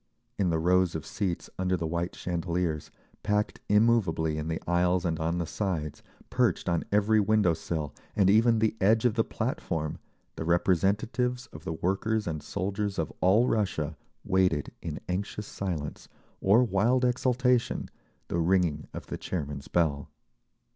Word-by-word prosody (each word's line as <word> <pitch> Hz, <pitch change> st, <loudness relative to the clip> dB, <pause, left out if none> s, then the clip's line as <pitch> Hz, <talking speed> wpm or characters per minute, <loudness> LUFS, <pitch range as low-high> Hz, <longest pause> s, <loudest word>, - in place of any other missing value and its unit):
In 95 Hz, -3 st, +2 dB
the 80 Hz, -, +1 dB
rows 90 Hz, +1 st, +2 dB
of 80 Hz, -, -4 dB
seats, 95 Hz, -5 st, -3 dB
under 95 Hz, 0 st, +1 dB
the 85 Hz, -, -3 dB
white 85 Hz, +2 st, -2 dB
chandeliers, 85 Hz, -3 st, -2 dB, 0.3 s
packed 105 Hz, 0 st, 0 dB
immovably 105 Hz, -8 st, +3 dB
in 75 Hz, -, -4 dB
the 80 Hz, 0 st, -2 dB
aisles 90 Hz, +1 st, +2 dB
and 80 Hz, -1 st, -1 dB
on 80 Hz, +2 st, 0 dB
the 85 Hz, -, -1 dB
sides, 80 Hz, -5 st, -3 dB, 0.3 s
perched -, -, +1 dB
on 85 Hz, -2 st, +1 dB
every 105 Hz, +1 st, +4 dB
window 105 Hz, -4 st, +3 dB
sill, 80 Hz, -2 st, -4 dB, 0.2 s
and 100 Hz, -3 st, +4 dB
even 115 Hz, +3 st, +5 dB
the 110 Hz, 0 st, +1 dB
edge 110 Hz, +4 st, +4 dB
of 120 Hz, -, +4 dB
the 115 Hz, 0 st, +2 dB
platform, 80 Hz, -7 st, -3 dB, 0.4 s
the -, -, -3 dB
representatives 100 Hz, +9 st, +1 dB
of 80 Hz, +2 st, -11 dB
the 80 Hz, -, -2 dB
workers 100 Hz, +6 st, 0 dB
and 80 Hz, -3 st, -3 dB
soldiers 100 Hz, +6 st, -3 dB
of 80 Hz, -2 st, -2 dB
all 105 Hz, +7 st, +4 dB
Russia 85 Hz, -9 st, 0 dB, 0.3 s
waited 90 Hz, -6 st, +1 dB
in -, -, -5 dB
anxious 100 Hz, +3 st, -3 dB
silence 85 Hz, -8 st, -5 dB, 0.3 s
or 105 Hz, +6 st, +5 dB
wild 120 Hz, +4 st, +2 dB
exultation 125 Hz, 0 st, +1 dB, 0.4 s
the 85 Hz, -, -1 dB
ringing 85 Hz, -3 st, +1 dB
of -, -, -6 dB
the -, -, -6 dB
chairman's 70 Hz, -5 st, -4 dB
bell. 75 Hz, -5 st, 0 dB
90 Hz, 155 wpm, -28 LUFS, 80-105 Hz, 0.4 s, even